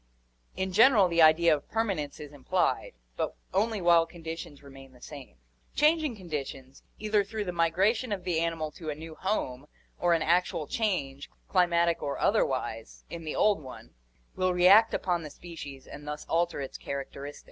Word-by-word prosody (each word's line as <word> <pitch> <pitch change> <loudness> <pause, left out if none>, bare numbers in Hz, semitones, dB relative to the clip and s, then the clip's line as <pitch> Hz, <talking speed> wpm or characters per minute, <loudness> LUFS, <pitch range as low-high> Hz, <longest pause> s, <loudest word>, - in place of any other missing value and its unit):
In 190 0 -3
general 220 -2 +6
the 170 -1 +2
idea 160 +1 +6
of 145 - -10
perma 225 -2 0
nence 145 -2 -6
is 150 -1 -9
implied, 140 -2 -1 0.2
but - - -2 0.2
only 215 +3 +1
while 170 -1 +5
conditions 165 -3 -8
remain 135 -1 -13
the 125 - -18
same; 140 - -11 0.4
changing 305 -3 +3
conditions, 140 -7 -7 0.2
either 210 -1 +1
through 210 +1 -4
the 180 - -2
migration 190 +8 +1
of 195 -3 -3
the 175 -3 0
animal 165 -2 -2
to 160 -2 -8
a 150 - -3
new 160 +1 -9
home 150 -8 -3 0.3
or 175 -1 +3
an 165 - 0
actual 170 -2 +1
change, 145 -10 -2 0.2
climatic 170 -2 +2
or 140 -1 -3
otherwise, - - -1
in 165 -1 -7
the 155 - -4
old 205 -5 +3
one, 130 -3 -11 0.4
will 185 -1 +1
react 195 +6 +6
upon 175 -2 -1
the 155 - -7
species 145 -4 -10
and 145 +1 -11
thus 150 0 -5
alter 170 0 0
its 135 - -7
characteristics. 140 +1 -6
170 Hz, 170 wpm, -28 LUFS, 145-190 Hz, 0.4 s, general